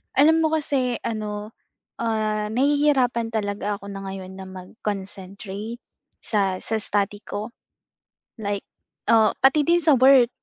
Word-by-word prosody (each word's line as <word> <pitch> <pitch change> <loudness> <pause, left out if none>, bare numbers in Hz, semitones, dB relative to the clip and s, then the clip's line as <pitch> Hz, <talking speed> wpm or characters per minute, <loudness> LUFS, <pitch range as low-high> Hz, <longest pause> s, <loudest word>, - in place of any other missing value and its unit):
Alam 320 +3 +5
mo 315 - +1
kasi, 270 -6 0
ano, 210 -1 -4 0.5
ah, 215 -2 0
nahihirapan 260 -4 +2
talaga 205 -1 -2
ako 200 - -9
na 195 0 -7
ngayon 190 -1 -7
na 190 - -8
mag-concentrate 195 +3 -6 0.4
sa 195 -4 0
sa 220 - 0
study 205 -1 0
ko. 210 +3 -5 0.9
LIke, 205 -2 -3 0.4
ah, 220 -1 +5
pati 270 +3 +5
din 345 +3 +3
sa 310 -4 +5
work 255 -1 +6
215 Hz, 125 wpm, -24 LUFS, 200-260 Hz, 0.9 s, work